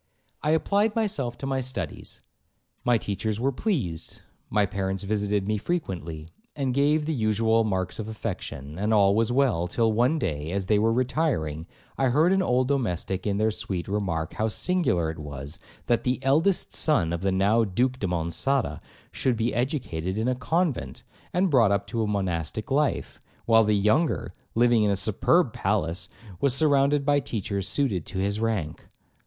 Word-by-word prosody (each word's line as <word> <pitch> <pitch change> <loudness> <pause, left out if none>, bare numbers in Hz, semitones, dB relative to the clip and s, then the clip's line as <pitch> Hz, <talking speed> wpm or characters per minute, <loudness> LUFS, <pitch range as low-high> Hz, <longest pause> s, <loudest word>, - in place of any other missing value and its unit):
I 150 - -1
applied 200 +7 +2
myself 150 - -1
to 135 - -6
my 135 -1 -1
studies, 120 - -6 0.6
my 120 -1 +3
teachers 105 +1 -3
were 135 +3 +1
pleased, 125 - -3 0.3
my 105 -1 +2
parents 95 -1 -3
visited 105 -1 -1
me 105 0 0
frequently, 85 - -4 0.3
and 135 -3 -1
gave 150 +3 +2
the 160 - -1
usual 110 -1 +2
marks 95 -3 -2
of 110 - -4
affection, 85 - -6
and 105 +2 +2
all 100 -1 +5
was 115 +2 +2
well; 120 -10 +2
till 115 +5 +1
one 120 +8 +2
day 80 - -3
as 100 -1 -1
they 105 +1 +3
were 110 +2 +3
retiring, 115 - -1 0.3
I 135 - +3
heard 155 +9 +3
an 195 - +3
old 130 -6 +2
domestic 95 - -1
in 100 -1 0
their 110 +1 +2
suite 95 -4 -4
remark, 95 -6 -2
how 110 - 0
singular 110 - 0
it 80 - -10
was, 70 -1 -7 0.3
that 120 -1 +1
the 125 +1 +1
eldest 160 +8 +2
son 110 - +2
of 85 - -3
the 95 0 +1
(now) 100 +5 +3
Duke 125 +6 0
de 100 - -1
Monçada 90 - -1 0.3
should 125 -3 0
be 115 +2 0
educated 115 - -2
in 110 +2 0
a 130 - +2
convent, 160 +3 -1 0.3
and 180 0 +1
brought 115 -7 +5
up 100 0 +1
to 115 +3 -2
a 110 - 0
monastic 95 - -2
life, 145 0 0 0.2
while 115 -1 +5
the 105 -1 +2
younger, 110 +11 +1 0.2
living 120 -1 +4
in 105 - +3
a 100 - +2
superb 110 - +2
palace, 95 -2 -1 0.3
was 135 -2 +3
surrounded 140 -1 +3
by 145 0 +4
teachers 100 -6 -3
suited 105 - 0
to 95 - -5
his 100 +2 0
rank. 105 -9 -2
110 Hz, 175 wpm, -26 LUFS, 95-135 Hz, 0.6 s, all